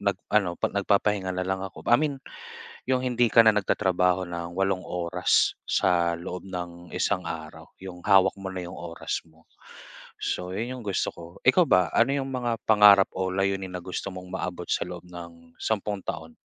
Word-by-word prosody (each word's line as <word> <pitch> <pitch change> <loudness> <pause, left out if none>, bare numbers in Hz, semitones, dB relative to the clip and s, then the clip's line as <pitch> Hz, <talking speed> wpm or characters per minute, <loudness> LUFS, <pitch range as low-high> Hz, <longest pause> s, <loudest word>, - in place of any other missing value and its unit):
nag-ano, 100 -2 0
'pa - - -1
nagpapahinga 100 -1 +1
na 90 - -1
lang 95 +1 -2
ako. 95 -1 -8
I - - +9
mean, 150 -2 0 0.8
'yong 130 0 +1
hindi 120 -2 +2
ka 115 -1 +6
na 110 - +7
nagtatrabaho 95 -3 +1
nang 85 0 -5
walong 95 -1 0
oras, 85 -1 +1
sa 85 -1 +2
loob 90 0 -6
nang 85 -1 -7
isang 90 - 0
araw. 80 0 -7
'Yong 90 -2 -9
hawak 95 -1 +5
mo 95 - -5
na 90 -1 -5
'yong 90 - -8
oras 85 -2 -5
mo, 80 0 -24 0.7
so 90 0 -3
'yon 115 +6 -3
'yong - - -9
gusto 100 - 0
ko. - - -11 0.2
Ikaw - - +6
ba, 90 -1 +4
ano 120 +4 +4
'yong 135 - -3
mga 120 -3 -2
pangarap 105 -2 +7
o 95 0 -1
layunin 95 0 -1
na 90 - -4
gusto 95 +1 -4
mong 90 0 -9
maabot 90 -2 -4
sa - - +1
loob 90 -1 -8
ng 85 -1 -12
sampung 105 -2 -2
taon? 80 0 -6
95 Hz, 180 wpm, -26 LUFS, 85-100 Hz, 0.8 s, I